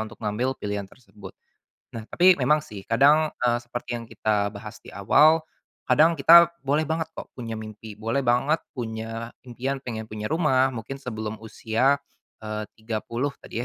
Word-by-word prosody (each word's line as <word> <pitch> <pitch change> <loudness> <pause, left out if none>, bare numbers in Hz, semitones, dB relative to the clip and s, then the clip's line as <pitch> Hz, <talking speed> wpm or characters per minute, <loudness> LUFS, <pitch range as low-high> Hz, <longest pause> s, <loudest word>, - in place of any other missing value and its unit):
untuk 110 +2 -9
ngambil 120 +6 -1
pilihan 100 -1 -4
tersebut. 100 -5 -14 0.6
Nah 110 - -5
tapi 180 +1 +6
memang 150 +4 +3
sih 100 -8 -10
kadang, 145 +6 +4
eee, 120 -1 +2
seperti 120 0 -5
yang 115 - -8
kita 105 -2 -1
bahas 105 -2 -9
di - - -12
awal, 155 - +5 0.5
kadang 160 +3 +5
kita 170 +3 +7
boleh 145 +3 +1
banget 160 +1 -2
kok - - -9
punya 115 -3 -6
mimpi, 110 -1 -9
boleh 115 +5 -1
banget 130 +6 +2 0.2
punya 115 0 -5
impian 130 +2 -4
pengen 110 -4 -5
punya 110 +1 -6
rumah, 135 -5 +2
mungkin 130 +3 -7
sebelum 110 -3 -5
usia, 115 +5 +1 0.5
eee, 110 0 -3 0.2
30 115 +5 -3
tadi - - -8
120 Hz, 160 wpm, -25 LUFS, 110-140 Hz, 0.6 s, kita